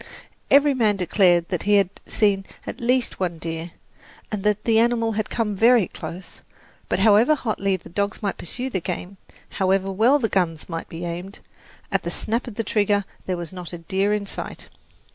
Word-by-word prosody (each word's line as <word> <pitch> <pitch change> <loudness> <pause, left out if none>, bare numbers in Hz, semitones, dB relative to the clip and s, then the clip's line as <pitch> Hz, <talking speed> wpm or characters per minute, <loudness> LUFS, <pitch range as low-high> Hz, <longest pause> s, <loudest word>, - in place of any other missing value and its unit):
Every 285 0 +6
man 220 -5 +2
declared 180 -2 +3
that 180 -4 -1
he 205 +1 +3
had 195 -2 +3 0.2
seen 200 -3 +1 0.2
at - - -6
least 250 +1 +1
one 175 -3 -1
deer, 165 +1 -5 0.6
and 210 -3 -3
that 210 0 +1
the 225 -1 +3
animal 230 -1 +2
had 215 0 -2
come 220 -3 -1
very 230 -1 +5
close; 180 +2 -9 0.5
but - - +1
however 220 +8 +5
hotly 200 -7 -1
the 170 - -14
dogs 200 +4 -2
might 200 - -2
pursue 250 +9 -4
the 190 - 0
game, 180 +2 -5 0.4
however 190 +1 +2
well 230 +9 +4
the 245 -6 0
guns 170 -6 -1
might 165 -1 -5
be 170 +1 -6
aimed, 175 +3 -5 0.5
at - - +1
the - - -4
snap 230 +3 -2
of 230 - -7
the 225 - -1
trigger 205 -1 +1 0.2
there 185 -1 -1
was 170 0 -6
not 180 -2 -6
a - - -4
deer 190 +4 0
in 210 -1 0
sight. - - -7
200 Hz, 190 wpm, -23 LUFS, 180-225 Hz, 0.6 s, Every